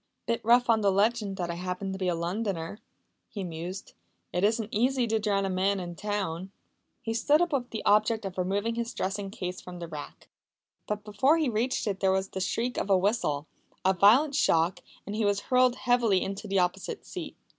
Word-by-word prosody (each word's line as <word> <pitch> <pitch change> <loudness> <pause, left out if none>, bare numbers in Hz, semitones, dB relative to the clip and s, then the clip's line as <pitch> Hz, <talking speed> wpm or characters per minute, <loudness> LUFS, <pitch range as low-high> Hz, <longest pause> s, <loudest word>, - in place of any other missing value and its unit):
"Bit 230 0 -1
rough 240 +2 +5
on 225 -2 +4
the 200 -1 +3
legend 205 0 +1
that 175 -3 -2
I - - -3
happened 180 +2 -4
to 190 - -6
be 185 - -1
a 175 - +1
Londoner!" 180 +1 -3 0.5
he 200 - -5
mused. 175 +2 -6 0.4
"It 180 +2 0
isn't 220 +1 +1
easy 250 +3 +2
to 220 -1 +1
drown 200 -2 +1
a - - -1
man 190 +2 +1
in 175 -1 -5
town!" 195 -3 -3 0.5
He 225 - -2
stood 290 +7 +3
up 350 -2 +1
with 250 -3 -1
the 220 - -5
object 215 +1 +3
of 190 -1 -5
removing 200 +5 0
his 235 0 -4
dressing 195 +1 -2
case 185 -3 -5
from 180 -1 -9
the 170 -1 -6
rack. 150 -3 -9 0.6
But 210 0 -3
before 215 +9 +3
he 310 -5 +1
reached 235 +3 0
it 200 -3 -2
there 190 -1 +3
was 190 0 0
the 190 - -5
shriek 235 +6 -1
of - - -3
a 195 - +5
whistle, 185 -7 0 0.4
a 190 - +5
violent 230 - +5
shock, 170 - +2 0.3
and 205 - -5
he 220 - 0
was 205 -1 +2
hurled 255 +1 +3
heavily 240 -7 +2
into 200 +2 -5
the 195 0 0
opposite 180 +1 -1
seat. - - -7
200 Hz, 210 wpm, -28 LUFS, 185-230 Hz, 0.6 s, rough